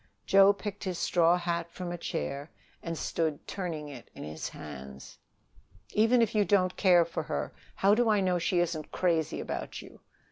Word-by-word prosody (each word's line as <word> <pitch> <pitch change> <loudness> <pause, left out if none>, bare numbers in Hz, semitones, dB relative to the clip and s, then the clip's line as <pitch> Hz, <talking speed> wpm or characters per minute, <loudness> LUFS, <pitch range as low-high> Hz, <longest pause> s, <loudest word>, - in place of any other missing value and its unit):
Joe 195 0 +7
picked 205 0 -6
his 185 -3 -3
straw 170 0 +3
hat 170 -1 -2
from 175 0 -6
a 175 - -4
chair 145 -3 -4 0.3
and 165 -1 -4
stood 155 -3 -2
turning 165 -6 -4
it 135 -5 -10
in - - -8
his 75 +1 -5
hands. 70 -2 -10 0.7
"Even 230 +3 +4
if 230 - -1
you 210 -1 +4
don't 190 -3 +2
care 175 -3 +5
for 165 - -3
her, - - -3 0.2
how 195 +1 +4
do 235 +1 +3
I 210 -1 +4
know 185 -2 +1
she 175 +1 0
isn't 160 -3 -3
crazy 165 -4 0
about - - -5
you?" - - -13
175 Hz, 180 wpm, -29 LUFS, 160-195 Hz, 0.7 s, Joe